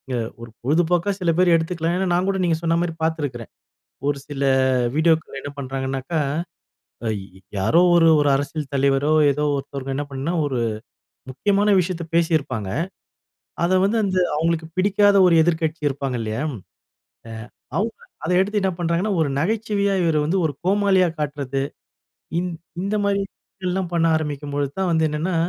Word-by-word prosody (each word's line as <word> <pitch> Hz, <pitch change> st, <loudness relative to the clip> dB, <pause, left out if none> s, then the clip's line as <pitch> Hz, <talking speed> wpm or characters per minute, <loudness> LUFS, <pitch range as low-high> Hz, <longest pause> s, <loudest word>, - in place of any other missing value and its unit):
அ -, -, 0 dB, 0.2 s
ஒரு 115 Hz, -, -8 dB
பொழுதுபோக்கா 170 Hz, +7 st, +1 dB
சில 175 Hz, -3 st, +2 dB
பேர் 180 Hz, -1 st, +4 dB
எடுத்துக்கலாம். 165 Hz, +1 st, -1 dB
ஏன்னா 190 Hz, -, 0 dB
நான் 180 Hz, +2 st, +1 dB
கூட 195 Hz, -1 st, +1 dB
நீங்க 170 Hz, -2 st, +2 dB
சொன்ன 165 Hz, 0 st, +1 dB
மாரி 175 Hz, -1 st, -1 dB
பார்த்துருக்கிறேன். 145 Hz, -8 st, -2 dB, 0.6 s
ஒரு 145 Hz, -1 st, 0 dB
சில 140 Hz, -2 st, -5 dB, 0.5 s
வீடியோக்கள்ல 160 Hz, -2 st, +1 dB
என்ன 145 Hz, -, -6 dB
பண்ணுறாங்கனாக்கா, 135 Hz, +3 st, -3 dB, 0.9 s
அய் 110 Hz, -1 st, 0 dB, 0.4 s
யாரோ 110 Hz, -, +3 dB
ஒரு 165 Hz, -1 st, +6 dB
ஒரு 145 Hz, -1 st, +3 dB
அரசியல் 145 Hz, +1 st, -3 dB
தலைவரோ, 140 Hz, +2 st, +2 dB, 0.2 s
ஏதோ 150 Hz, +2 st, -2 dB
ஒருத்தவங்க 135 Hz, -1 st, -5 dB
என்ன 145 Hz, -, -1 dB
பண்ணினா, 135 Hz, +5 st, -3 dB
ஒரு 135 Hz, -4 st, -1 dB, 0.7 s
முக்கியமான 205 Hz, +8 st, +2 dB
விஷயத்த 175 Hz, -1 st, -2 dB
பேசியிருப்பாங்க. 145 Hz, -, 0 dB, 1.0 s
அத 185 Hz, +2 st, +3 dB
வந்து 215 Hz, +4 st, +1 dB
அந்த 190 Hz, -2 st, 0 dB, 0.2 s
அவங்களுக்கு 160 Hz, +1 st, 0 dB
பிடிக்காத 205 Hz, +1 st, +4 dB
ஒரு 170 Hz, -, +4 dB
எதிர்க்கட்சி 160 Hz, -1 st, 0 dB
இருப்பாங்க 135 Hz, -2 st, -3 dB
இல்லையா, 110 Hz, +3 st, -3 dB
அ -, -, -6 dB, 1.2 s
அவுங்க 220 Hz, +3 st, -1 dB, 0.3 s
அதை 180 Hz, -, 0 dB
எடுத்து 205 Hz, +2 st, +1 dB
என்ன 190 Hz, -, +1 dB
பண்ணுறாங்கன்னா, 175 Hz, +4 st, 0 dB
ஒரு 150 Hz, -, 0 dB
நகைச்சுவையா 200 Hz, +1 st, 0 dB
இவர 165 Hz, -2 st, +2 dB
வந்து 180 Hz, +5 st, +1 dB
ஒரு 150 Hz, -, -2 dB
கோமாளியா 190 Hz, -1 st, +3 dB
காட்டுறது. 140 Hz, -2 st, -2 dB, 0.8 s
இந் 180 Hz, 0 st, -2 dB, 0.3 s
இந்த 200 Hz, +3 st, -1 dB
மாதிரிலாம் 190 Hz, -2 st, -3 dB
பண்ண 165 Hz, -1 st, +2 dB
ஆரம்பிக்கும்போது 145 Hz, -2 st, -3 dB
தான் 190 Hz, -2 st, +1 dB
வந்து 160 Hz, -1 st, +3 dB
என்னென்னா, 160 Hz, +4 st, -2 dB
165 Hz, 145 wpm, -22 LUFS, 140-185 Hz, 1.2 s, ஒரு